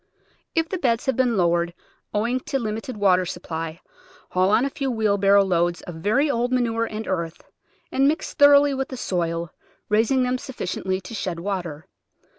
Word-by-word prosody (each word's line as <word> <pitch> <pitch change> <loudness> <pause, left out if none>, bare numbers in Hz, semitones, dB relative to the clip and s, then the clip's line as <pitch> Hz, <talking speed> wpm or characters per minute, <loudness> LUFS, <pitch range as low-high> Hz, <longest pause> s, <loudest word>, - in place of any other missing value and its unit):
If 325 0 +2
the 375 +1 -3
beds 240 -6 +1
have 265 -2 +1
been 245 -3 +2
lowered 170 -1 +1 0.4
owing 235 +5 0
to 270 - -2
limited 220 0 -4
wa 195 -3 +4
ter 185 - 0
supply 165 -1 -5 0.5
haul 185 +1 +2
on 225 +5 +3
a - - 0
few 275 -1 -2
wheel 215 -4 +1
barrow 200 0 +5
loads 175 -2 0
of 175 - -7
very 215 - +1
old 245 -3 0
manure 230 -2 +1
and 220 0 -6
earth, 170 -3 -3 0.5
and 270 +1 +3
mix 305 +2 -1
thoroughly 285 -1 +6
with 270 0 -2
die 260 - -7
soil, 170 -7 -2 0.4
raising 225 +5 +3
them 250 0 0
sufficiently 190 -6 -3
to 185 - -10
shed 185 -5 -3
water. 175 -5 -4
215 Hz, 180 wpm, -23 LUFS, 180-255 Hz, 0.5 s, thoroughly